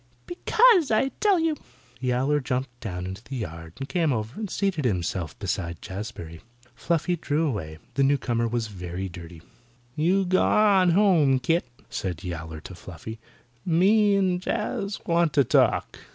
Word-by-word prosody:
"Because, 375 - +4
I 225 +5 +2
tell 405 -4 +4
you." 325 -1 +1 0.4
Yowler 130 +3 +1
jumped 130 -2 -3
down 90 -4 -5
into 95 +4 -7
the 135 - -7
yard 85 -8 -6
and 135 - -5
came 160 0 +1
over 110 -1 -2
and 215 -3 -4
seated 190 -5 -1
himself 90 - -2
beside 85 -4 -3
Jazbury. 95 -5 -7 0.3
Fluffy 170 +4 0
drew 155 0 -1
away. 80 - -3 0.2
The 140 - 0
newcomer 130 -4 +1
was 115 0 -1
very 95 -2 -5
dirty. 85 -2 -11 0.5
"You 185 +5 +2
gwan 190 +1 +4
home, 170 -9 +4
kit," 165 +4 0 0.2
said 90 -4 -4
Yowler 80 -3 -6
to 95 - -10
Fluffy. 90 +5 -9 0.4
"Me 200 +5 +4
and 185 -2 +1
Jaz 210 0 -2
want 170 -2 +2
to 140 - +5
talk." - - +2
135 Hz, 150 wpm, -25 LUFS, -, 0.5 s, to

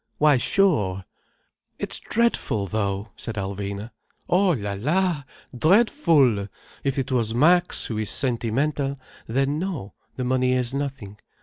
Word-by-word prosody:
Why 150 -2 +5
sure!" 105 - +2 0.7
"It's - - -1
dreadful, 230 - 0
though—!" 100 +1 -2
said 115 - -6
Alvina. 100 +2 -4 0.4
"Oh 190 +2 +3
la 100 -7 -3
la! 150 - 0 0.3
Dreadful! 155 - +3 0.4
If 140 0 -1
it 135 0 -2
was 115 -3 +1
Max, 175 +7 +3
who 110 -2 -3
is 110 -2 -1
sentimental, 135 +3 -1 0.3
then 135 +5 0
no, 165 - -4 0.2
the 130 - -3
money 130 0 +1
is 125 0 0
nothing. 135 -8 -5
130 Hz, 125 wpm, -24 LUFS, 105-150 Hz, 0.7 s, Why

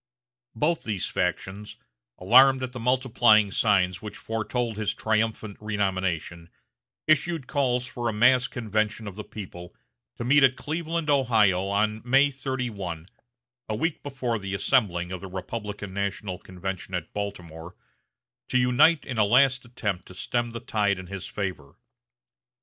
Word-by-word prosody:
Both 155 +8 +1
these 105 -4 -2
factions, 95 +3 -3 0.4
alarmed 130 +7 +6
at 125 - -3
the 125 - -7
multiplying 120 -4 +3
signs 95 -4 +2
which 105 -2 -7
foretold 115 +1 -2
his 110 -1 -1
triumphant 110 -1 -1
renomination, 95 -5 -2 0.6
issued 155 -1 +2
calls 125 -3 0
for 120 -2 -3
a - - -2
mass 125 +3 +4
convention 110 -1 -2
of 100 - -7
the 105 - -6
people, 90 -5 -9 0.4
to - - -5
meet 145 +4 +5
at 130 -1 +5
Cleveland, 160 +1 -2
Ohio, 110 -9 +3
on 105 +2 0
May 135 +4 +4
31, 115 - -4 0.6
a 110 - -1
week 165 +6 -1
before 130 -5 -3
the 95 0 -4
assembling 95 -7 +1
of 95 - -5
the 95 - -7
Republican 105 +1 -6
national 100 -1 -3
convention 95 0 -6
at 90 -3 -5
Baltimore, 90 -4 -6 0.7
to 130 - +2
unite 130 +6 +4
in 125 -4 -4
a - - +6
last 130 +4 +4
attempt 105 -6 -4
to 95 - -12
stem 120 +5 -1
the 115 0 -6
tide 105 -3 0
in 95 - -8
his 95 0 -6
favor. 95 -9 -5
110 Hz, 145 wpm, -26 LUFS, 95-125 Hz, 0.7 s, alarmed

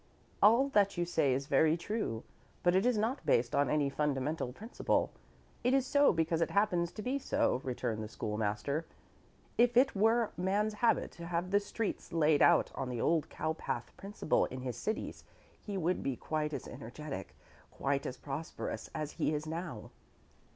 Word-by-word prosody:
"All 235 +6 +6
that 200 -6 +3
you 175 - +1
say 160 -5 +2
is 135 +2 0
very 155 +3 +3
true, 170 - -3 0.4
but 175 - +4
it 190 +6 +3
is 250 -3 +2
not 230 +6 -1
based 120 +1 +2
on 140 -2 +3
any 150 -2 +2
fundamental 145 -1 -1
principle. 220 - -1 0.5
It 250 +2 +3
is 270 -2 +2
so 285 +2 +5
because 165 -1 0
it 165 - +2
happens 180 -5 +1
to 215 - -6
be 265 +3 -1
so," 130 - +1
returned 120 -3 -2
the - - -5
School 105 -1 -4
master. 110 +9 -1 0.7
"If 240 0 +4
it 265 -1 +5
were 225 +2 +3
man's 200 +4 0
habit 225 +2 +2
to 170 0 -9
have 175 +1 -2
the 200 - +5
streets 205 +1 -4
laid 155 -3 +3
out - - +5
on 130 - -4
the 125 -2 -3
old 160 +4 +1
cowpath 160 0 -3
principle 195 -5 0
in 130 0 -6
his 125 -2 -4
cities 215 - -4 0.4
he 205 -2 -4
would 180 0 0
be 135 - -1
quite 150 +3 -2
as - - -5
energetic, 140 +6 -7 0.3
quite 140 +1 -1
as 125 - -5
prosperous, 145 +5 -5
as 155 -2 -3
he 155 - 0
is 150 +1 -3
now." 160 -7 -5
165 Hz, 180 wpm, -33 LUFS, 140-210 Hz, 0.7 s, All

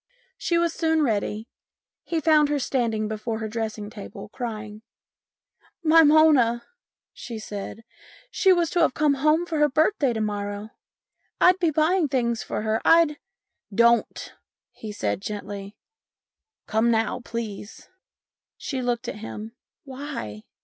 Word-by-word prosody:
She 340 - 0
was 335 -1 +1
soon 320 -2 +1
ready. 215 -2 -1 0.6
He 335 - -1
found 305 -1 +4
her 295 - +1
standing 230 -5 -1
before 220 +1 -3
her 220 0 -4
dressing 220 -1 -4
table, 210 -2 -9
crying. 215 -2 -6 0.5
" - - -37
My 330 - +9
Mona! 290 -7 +5 0.2
" - - -70
she 230 - -7
said, 210 +1 -7 0.2
" - - -24
she 380 - +3
was 345 -3 +2
to 350 - +1
have 320 -6 +3
come 300 -2 +3
home 305 +5 +2
for 320 -3 -2
her 295 0 +4
birthday 310 -1 +2
to 220 - -3
morrow. 205 0 -3 0.7
I'd 365 +1 +5
been 335 -3 +1
buy 315 +4 +3
ing 335 -5 +2
things 235 -4 0
for - - -4
her. 220 0 0
I'd 330 -3 +4 0.2
" - - -62
" 200 - -15
Don't! 235 0 +2 0.2
" - - -70
he 215 - -5
said 110 - -2
gently. 200 -1 -6 0.5
" 440 - -68
Come 220 +2 +1
now, 225 +1 +1
please." 220 -3 -7 0.7
She 265 -5 -4
looked 245 0 -2
at - - -5
him. 220 0 -7 0.2
" - - -69
Why 260 - -7
235 Hz, 165 wpm, -24 LUFS, 215-310 Hz, 0.7 s, My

